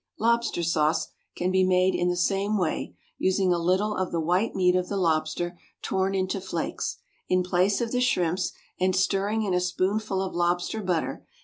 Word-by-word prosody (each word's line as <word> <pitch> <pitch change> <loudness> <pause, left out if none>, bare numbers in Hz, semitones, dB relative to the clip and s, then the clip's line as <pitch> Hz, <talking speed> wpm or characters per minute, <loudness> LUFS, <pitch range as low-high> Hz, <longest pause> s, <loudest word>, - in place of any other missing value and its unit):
=Lobster 235 -5 +1
Sauce= 160 -1 +1 0.3
can 180 +1 0
be 190 0 +3
made 185 0 +3
in 175 - +1
the 175 - 0
same 195 +4 +1
way, 180 -5 -2 0.2
using 190 -1 +2
a 175 - 0
little 190 +5 +1
of 185 -1 -2
the 170 - -1
white 180 +7 +1
meat 180 -1 +3
of 180 0 0
the 200 - -2
lobster 170 0 0 0.2
torn 190 +1 0
into 190 +1 -1
flakes, 170 -3 -3 0.3
in 185 0 +3
place 185 +4 +1
of 230 -1 -2
the 250 - +1
shrimps, 180 -6 +1 0.3
and 185 0 +2
stirring 200 +3 +1
in 195 -3 -1
a 180 - +3
spoonful 190 +2 0
of 190 - -4
lobster 175 +5 0
butter. 180 -4 -2
185 Hz, 185 wpm, -26 LUFS, 175-195 Hz, 0.3 s, be